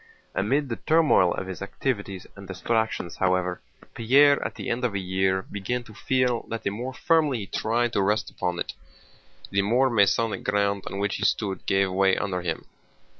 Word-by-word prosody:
Amid 135 +8 0
the 115 - -3
turmoil 155 - +4
of 95 - -3
his 95 -1 -7
activities 100 -2 -3
and 100 -1 -11
distractions, 110 -1 -2
however, 90 -1 0 0.3
Pierre 140 +5 +4
at - - -4
the - - -6
end 120 +2 -1
of 120 -5 0
a - - 0
year 95 0 0
began 110 +7 -4
to 110 - -14
feel 125 +1 0
that 115 - -4
the 100 - 0
more 125 +5 -5
firmly 155 -5 +2
he 105 - -5
tried 120 +4 0
to - - +2
rest 105 +3 0
upon 90 -1 -2
it, - - -3 0.8
the 100 - +2
more 120 +6 +2
Masonic 110 +1 +2
ground 100 -1 0
on 95 - -5
which 100 0 -1
he - - -4
stood 100 -3 -1
gave 95 -1 +2
way 95 0 +3
under 95 -3 -2
him. 85 -2 -3
100 Hz, 185 wpm, -25 LUFS, 95-120 Hz, 0.8 s, turmoil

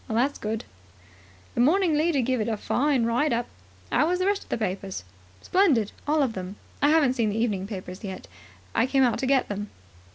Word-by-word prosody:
"That's 245 +6 +1
good." 220 +1 -3 0.9
"The - - +1
Morning 340 +5 +4
Leader 305 -2 +2
give 255 -1 0
it 215 - -1
a 220 - -1
fine 270 +3 +1
write 245 +6 +1
up. 235 0 0 0.5
How 305 - +3
was 360 +1 +1
the 370 - 0
rest 400 0 +1
of - - -16
the - - -1
papers?" 195 - -3 0.4
"Splendid, 290 - +3 0.2
all 300 0 +3
of 250 -4 -1
them. 185 0 -6 0.3
I 290 - +5
haven't 300 -5 +4
seen 230 -4 +1
the 205 - -2
evening 205 -5 0
papers 185 -2 -7
yet. 190 -2 -6 0.5
I 240 - +2
came 270 0 +3
out 245 -3 +2
to 265 - -1
get 265 -1 +3
them." 205 0 -4
245 Hz, 205 wpm, -26 LUFS, 210-290 Hz, 0.9 s, I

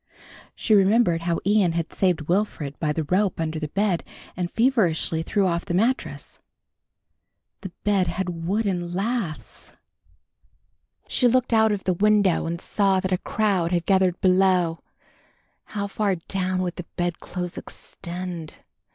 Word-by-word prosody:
She 220 - +1
remembered 195 -3 +4
how 170 0 0
Ian 200 -4 +3
had 165 -1 -3
saved 180 -4 +1
Wilfred 165 -4 -1
by 155 -2 0
the 160 +1 -1
rope 185 +5 0
under 160 -1 -2
the 155 - -3
bed 195 +1 0 0.3
and 175 -1 -2
feverishly 195 -10 +1
threw 195 +4 0
off 170 -2 0
the 175 -3 -3
mattrass. 235 +8 -1 1.2
The 190 - -6
bed 200 -3 +2
had 175 -3 -3
wooden 185 -4 -1
laths! 195 - -4 1.3
She 250 - +3
looked 250 0 +2
out 220 -1 +5
of 205 -2 -2
the 185 - +1
window 200 -2 +3
and 170 +1 -3
saw 195 -1 +2
that 185 0 -3
a 180 - +1
crowd 195 -6 0
had 175 -1 0
gathered 190 -2 +2
below. 185 -3 +3 0.9
How 205 -1 -4
far 200 -1 0
down 185 +1 -2
would 175 -1 -4
the 180 - -6
bedclothes 175 0 -3
extend? 175 -2 -7
185 Hz, 145 wpm, -24 LUFS, 170-205 Hz, 1.3 s, out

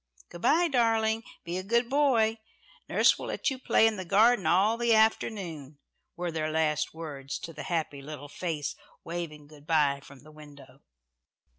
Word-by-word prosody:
"Good 175 - -11
bye, 340 - +4
darling. 225 -4 +1 0.2
Be 175 +2 -3
a - - -6
good 235 +4 +1
boy. 240 -5 +2 0.5
Nurse - - +4
will - - -6
let - - -1
you 260 - -5
play 225 - +3
in 220 -1 +2
the 185 - -4
garden 210 +4 +4
all 200 +5 +3
the 235 -1 +2
afternoon," 180 - 0 0.4
were 175 -1 -3
their 155 -1 -2
last 155 -1 0
words 140 -4 -6
to 165 - -8
the 150 - -8
happy 155 -5 -2
little 145 0 -8
face 150 -1 -4 0.3
waving 165 -3 -6
good 150 0 -17
bye 145 -4 +2
from 140 -1 -15
the 155 - -15
window. 145 -3 -15
170 Hz, 170 wpm, -28 LUFS, 150-220 Hz, 0.5 s, bye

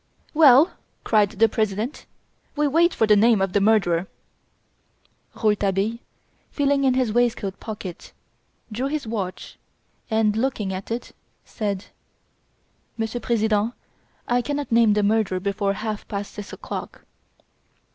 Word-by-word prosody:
"Well," 300 0 +6 0.3
cried 210 -3 +3
the 220 +2 +3
President, 215 +3 -2 0.5
"we 295 0 +2
wait 335 +5 +3
for 225 - +1
the 210 -1 +5
name 220 +1 +4
of 190 -1 -1
the 205 - +2
murderer." 195 -5 +2 1.3
Rouletabille, 210 +1 0 0.5
feeling 280 -1 +1
in 260 -1 +3
his 250 -5 +1
waistcoat 230 -5 0
pocket, 205 -5 -8 0.6
drew 245 +5 -2
his 295 -1 -3
watch 200 -5 -5 0.5
and, 220 -2 +2
looking 220 -5 -1
at 185 +1 -6
it, 230 +2 -5 0.3
said: 205 -4 -3 1.1
"Monsieur 225 +1 -2
President, 220 -1 0 0.5
I 245 0 +2
cannot 290 +1 -4
name 230 -2 +5
the 210 0 +1
murderer 205 -3 +1
before 200 +1 -1
half 215 +1 -5
past 200 0 -5
six 205 -1 -8
o'clock!" - - -7
220 Hz, 125 wpm, -23 LUFS, 205-245 Hz, 1.3 s, Well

